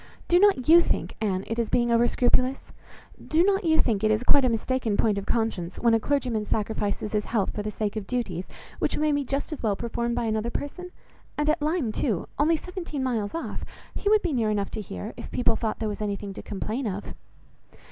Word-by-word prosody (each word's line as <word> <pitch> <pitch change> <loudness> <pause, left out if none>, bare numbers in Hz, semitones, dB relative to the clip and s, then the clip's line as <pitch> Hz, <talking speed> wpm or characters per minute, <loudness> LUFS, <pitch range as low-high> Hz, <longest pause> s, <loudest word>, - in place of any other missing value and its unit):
Do 350 - +5
not 390 -11 +4
you 335 +2 +9
think, - - -2
Anne, 195 -3 0
it 230 +1 -3
is 230 - 0
being 240 -1 +2
over 235 +1 +4
scrupulous? 255 +2 +2 0.6
Do 320 +2 +3
not 390 +1 +2
you 315 -1 +4
think 220 -3 +1
it 215 - +4
is 215 +2 +2
quite 275 +2 +5
a 255 - +3
mistaken 230 -1 0
point 210 -3 +2
of 200 - -8
conscience, 220 -7 -1
when 235 -1 +3
a 225 - +4
clergyman 250 -4 0
sacrifices 210 -1 -2
his 210 -1 0
health 215 -5 0
for 210 - -3
the 210 - -3
sake 210 0 -3
of 210 -3 -4
duties, 195 -8 -2 0.3
which - - 0
may 305 0 +2
be 285 -1 +1
just 275 +4 -2
as 305 - -7
well 210 -3 +1
performed 235 +1 -2
by - - -1
another 220 +1 0
person? 360 +8 -5 0.5
And 295 0 0
at 310 0 -2
Lyme 300 -6 0
too, 215 - -1
only 320 +3 +4
seventeen 340 -5 -5
miles 225 -4 -1
off, 330 - -4 0.3
he 405 - -1
would 430 0 +4
be 345 -5 0
near 230 -4 +1
enough 205 -2 -1
to - - -4
hear, 90 - -6
if - - -8
people 245 - +1
thought 220 -2 -2
there 220 - -2
was 210 0 -4
anything 205 -1 -3
to - - -7
complain 220 +5 -3
of." 200 0 -5
235 Hz, 225 wpm, -26 LUFS, 210-285 Hz, 0.6 s, you